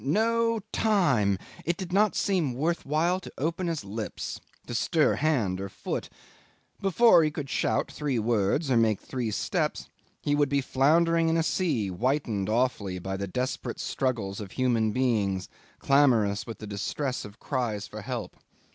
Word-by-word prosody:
No 230 Hz, +7 st, +2 dB
time! 140 Hz, -, +2 dB, 0.3 s
It 170 Hz, +1 st, -1 dB
did 185 Hz, -2 st, -6 dB
not 210 Hz, +2 st, +3 dB
seem 175 Hz, -, +1 dB
worth 160 Hz, +5 st, -1 dB
while 165 Hz, +5 st, +2 dB
to 190 Hz, -, -10 dB
open 170 Hz, +5 st, -1 dB
his 160 Hz, -11 st, -3 dB
lips, 105 Hz, +2 st, -5 dB, 0.3 s
to -, -, -6 dB
stir 155 Hz, +6 st, +2 dB
hand 115 Hz, -12 st, +1 dB
or 100 Hz, -, -4 dB
foot. -, -, -4 dB, 0.7 s
Before 195 Hz, -1 st, +5 dB
he 155 Hz, -, +2 dB
could 150 Hz, -3 st, -6 dB
shout -, -, 0 dB
three 145 Hz, -4 st, -2 dB
words, 115 Hz, -, +1 dB
or 120 Hz, -, +4 dB
make 110 Hz, -3 st, +3 dB
three 125 Hz, -4 st, -3 dB
steps, 105 Hz, -, -1 dB, 0.3 s
he 145 Hz, -, +1 dB
would 145 Hz, -1 st, +2 dB
be 140 Hz, 0 st, +2 dB
floundering 165 Hz, +5 st, +3 dB
in 165 Hz, -, +2 dB
a 165 Hz, -, +2 dB
sea 150 Hz, -, 0 dB
whitened 110 Hz, -1 st, -1 dB
awfully 110 Hz, -5 st, 0 dB
by 95 Hz, +2 st, -4 dB
the 100 Hz, +1 st, -3 dB
desperate 125 Hz, +7 st, -3 dB
struggles 110 Hz, -7 st, -2 dB
of 100 Hz, -3 st, -8 dB
human 120 Hz, -4 st, +1 dB
beings, 105 Hz, -6 st, 0 dB, 0.3 s
clamorous 120 Hz, -8 st, +3 dB
with 115 Hz, -, -6 dB
the 110 Hz, -, -8 dB
distress 125 Hz, +6 st, -3 dB
of 105 Hz, +1 st, -11 dB
cries 115 Hz, -7 st, -2 dB
for 110 Hz, -, -8 dB
help. 120 Hz, 0 st, -5 dB
130 Hz, 165 wpm, -27 LUFS, 105-160 Hz, 0.7 s, Before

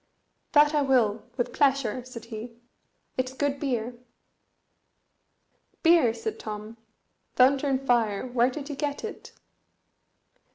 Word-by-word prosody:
"That 295 Hz, 0 st, +6 dB
I 300 Hz, -, +3 dB
will, 245 Hz, -4 st, +1 dB
with 245 Hz, -, -1 dB
pleasure," 270 Hz, -4 st, +1 dB
said 235 Hz, -3 st, -9 dB
he; 230 Hz, +1 st, -8 dB, 0.6 s
"it's 255 Hz, 0 st, -1 dB
good 280 Hz, +1 st, -1 dB
beer." 245 Hz, -4 st, -2 dB, 1.9 s
"Beer!" 330 Hz, -8 st, +5 dB
said 425 Hz, -, -5 dB
Tom. 215 Hz, +1 st, -7 dB, 0.6 s
"Thunder 270 Hz, +3 st, +4 dB
and 270 Hz, 0 st, 0 dB
fire! 230 Hz, -5 st, +1 dB
where 245 Hz, 0 st, +2 dB
did 280 Hz, +2 st, -7 dB
you 290 Hz, -, -5 dB
get 285 Hz, +4 st, -3 dB
it?" 440 Hz, -, -7 dB
255 Hz, 120 wpm, -27 LUFS, 230-285 Hz, 1.9 s, That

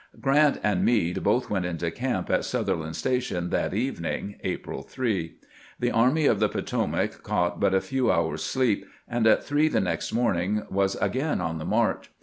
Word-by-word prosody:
Grant 145 Hz, +2 st, +3 dB
and 105 Hz, -4 st, +1 dB
Meade 95 Hz, -8 st, +2 dB
both 120 Hz, +4 st, +1 dB
went 95 Hz, -3 st, 0 dB
into 85 Hz, -1 st, -2 dB
camp 120 Hz, -4 st, -2 dB
at -, -, +2 dB
Sutherland's 80 Hz, 0 st, -2 dB
Station 125 Hz, -9 st, -1 dB
that -, -, 0 dB
evening 100 Hz, -3 st, -3 dB
(April -, -, -4 dB
3). 100 Hz, -11 st, -2 dB, 0.4 s
The 120 Hz, 0 st, +1 dB
Army 130 Hz, +7 st, +3 dB
of 110 Hz, -, +3 dB
the 105 Hz, -1 st, +3 dB
Poto -, -, -1 dB
mac -, -, -2 dB
caught -, -, -1 dB
but 95 Hz, -, +3 dB
a 95 Hz, -, +3 dB
few 130 Hz, -4 st, +1 dB
hours' 85 Hz, -3 st, 0 dB
sleep, 130 Hz, -6 st, 0 dB, 0.2 s
and 120 Hz, -1 st, +1 dB
at 110 Hz, -, +4 dB
three 145 Hz, +2 st, +2 dB
the -, -, +1 dB
next 85 Hz, -3 st, -2 dB
morning 105 Hz, -3 st, +1 dB
was 95 Hz, 0 st, +1 dB
again 145 Hz, +4 st, -1 dB
on 80 Hz, -2 st, -2 dB
the 80 Hz, -, -5 dB
march. -, -, 0 dB
105 Hz, 180 wpm, -26 LUFS, 90-125 Hz, 0.4 s, at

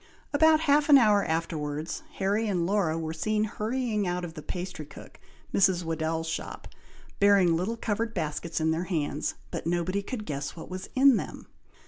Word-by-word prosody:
About 315 Hz, +1 st, +5 dB
half 295 Hz, 0 st, +3 dB
an 285 Hz, -, +10 dB
hour 210 Hz, -5 st, +4 dB
afterwards, 160 Hz, -1 st, -3 dB
Harry 205 Hz, +3 st, 0 dB
and 180 Hz, -4 st, 0 dB
Laura 180 Hz, -4 st, +1 dB
were 160 Hz, -1 st, -3 dB
seen 210 Hz, +7 st, 0 dB
hurrying 215 Hz, -1 st, -1 dB
out 180 Hz, 0 st, -2 dB
of 165 Hz, -, -8 dB
the 155 Hz, -, -8 dB
pastry 180 Hz, 0 st, -5 dB
cook, -, -, -13 dB, 0.3 s
Mrs. 185 Hz, -2 st, +3 dB
Weddell's 165 Hz, 0 st, -2 dB
shop, 160 Hz, -, -5 dB, 0.5 s
bearing 200 Hz, -4 st, +5 dB
little 195 Hz, +8 st, -2 dB
covered 225 Hz, +1 st, -2 dB
baskets 160 Hz, -1 st, -2 dB
in 160 Hz, 0 st, +2 dB
their 165 Hz, +3 st, -1 dB
hands, 155 Hz, -5 st, -2 dB, 0.2 s
but -, -, -4 dB
nobody 175 Hz, +3 st, 0 dB
could 215 Hz, +1 st, -6 dB
guess 140 Hz, -3 st, -4 dB
what 165 Hz, +2 st, -10 dB
was 185 Hz, 0 st, -6 dB
in 265 Hz, -2 st, +6 dB
them. -, -, -6 dB
185 Hz, 170 wpm, -28 LUFS, 160-215 Hz, 0.5 s, an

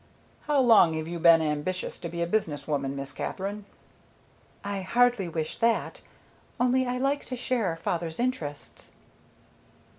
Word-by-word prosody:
"How 295 Hz, -2 st, +3 dB
long 225 Hz, -10 st, +6 dB
have 160 Hz, 0 st, -3 dB
you 170 Hz, 0 st, -5 dB
been 165 Hz, -1 st, +6 dB
ambitious 155 Hz, +5 st, -2 dB
to 170 Hz, -, -5 dB
be 170 Hz, 0 st, -2 dB
a -, -, 0 dB
business 170 Hz, -6 st, -1 dB
woman, 140 Hz, -2 st, -1 dB
Miss 140 Hz, 0 st, -5 dB
Katherine?" 200 Hz, +2 st, -4 dB, 1.0 s
"I 200 Hz, -1 st, -3 dB
hardly 235 Hz, -1 st, +2 dB
wish 160 Hz, -1 st, -4 dB
that. 230 Hz, 0 st, 0 dB, 0.6 s
Only 255 Hz, +1 st, +2 dB
I 250 Hz, 0 st, -1 dB
like 275 Hz, +2 st, 0 dB
to 255 Hz, -, -5 dB
share 240 Hz, -8 st, -1 dB
father's 165 Hz, 0 st, -3 dB
interests." 165 Hz, -, -4 dB
185 Hz, 145 wpm, -27 LUFS, 160-245 Hz, 1.0 s, long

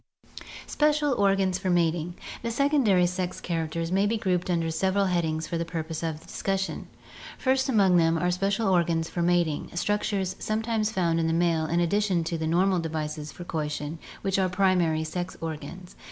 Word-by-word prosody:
Special 300 Hz, -1 st, +2 dB
Organs 195 Hz, -4 st, +2 dB
for 185 Hz, -, -2 dB
Mating. 170 Hz, -1 st, +1 dB
— -, -, -10 dB
The 230 Hz, -, -2 dB
secondary 235 Hz, -8 st, +3 dB
sex 180 Hz, 0 st, -2 dB
characters 165 Hz, 0 st, -3 dB
may 195 Hz, +2 st, +3 dB
be 225 Hz, +2 st, 0 dB
grouped 185 Hz, -4 st, -1 dB
under 165 Hz, -2 st, 0 dB
several 190 Hz, +4 st, +1 dB
headings 165 Hz, -3 st, 0 dB
for 170 Hz, -, -3 dB
the -, -, 0 dB
purpose 160 Hz, -1 st, -4 dB
of 160 Hz, -1 st, -4 dB
discussion. 195 Hz, 0 st, -3 dB, 0.5 s
First 265 Hz, +1 st, +1 dB
among 195 Hz, -7 st, +4 dB
them 165 Hz, 0 st, +3 dB
are 180 Hz, +2 st, +1 dB
special 195 Hz, +4 st, 0 dB
organs 170 Hz, -3 st, +2 dB
for 175 Hz, -, -3 dB
mating, 170 Hz, -3 st, +1 dB
structures 200 Hz, 0 st, -1 dB
some 215 Hz, +1 st, -1 dB
times 220 Hz, -2 st, 0 dB
found 170 Hz, -5 st, +1 dB
in 165 Hz, -, +1 dB
the 165 Hz, -, +1 dB
male 165 Hz, -2 st, +1 dB
in 170 Hz, +2 st, +1 dB
addition 185 Hz, 0 st, +1 dB
to 165 Hz, +1 st, -2 dB
the 160 Hz, -, -1 dB
normal 180 Hz, +3 st, +2 dB
devices 155 Hz, -2 st, -4 dB
for 175 Hz, -, -9 dB
coition, 150 Hz, -2 st, -4 dB, 0.2 s
which 195 Hz, -1 st, +1 dB
are 185 Hz, -1 st, +2 dB
primary 180 Hz, -4 st, +2 dB
sex 175 Hz, +3 st, -4 dB
organs. 165 Hz, +3 st, -7 dB
175 Hz, 180 wpm, -27 LUFS, 165-195 Hz, 0.5 s, among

